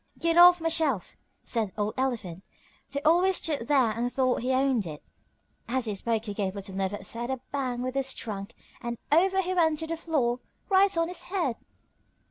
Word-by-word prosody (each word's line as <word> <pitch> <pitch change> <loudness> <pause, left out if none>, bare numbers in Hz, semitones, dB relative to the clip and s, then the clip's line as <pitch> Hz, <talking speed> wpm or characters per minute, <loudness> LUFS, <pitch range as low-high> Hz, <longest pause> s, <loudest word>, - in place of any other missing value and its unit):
"Get 335 0 +1
off 350 +1 +8
my 330 - -1
shelf!" 300 - 0 0.3
said 220 -5 -2
old 210 0 -1
Elephant, 225 -9 -3 0.5
who 280 - -2
always 355 +4 +4
stood 290 -10 -1
there 265 -6 +3
and 235 +3 -2
thought 255 -1 +1
he 255 +2 -1
owned 260 -6 +2
it, 150 -2 -8 0.6
and 250 +3 -1
as 255 - 0
he 215 - -2
spoke 225 +2 -1
he 205 - -4
gave 195 -2 -2
Little 195 -1 -6
Never 195 +1 -1
upset 230 +4 -4
a 265 -1 -2
bang 255 -3 -2
with 255 0 -3
his 270 -1 -1
trunk 200 -3 -6 0.3
and 235 -1 -4
over 380 +5 +4
he 365 +1 -2
went 320 -3 +2
on - - -4
the 330 - -1
floor, 275 -7 0 0.3
right 390 -1 +4
on 330 0 +2
his 360 0 -2
head! 345 -11 -1
260 Hz, 200 wpm, -27 LUFS, 225-325 Hz, 0.6 s, off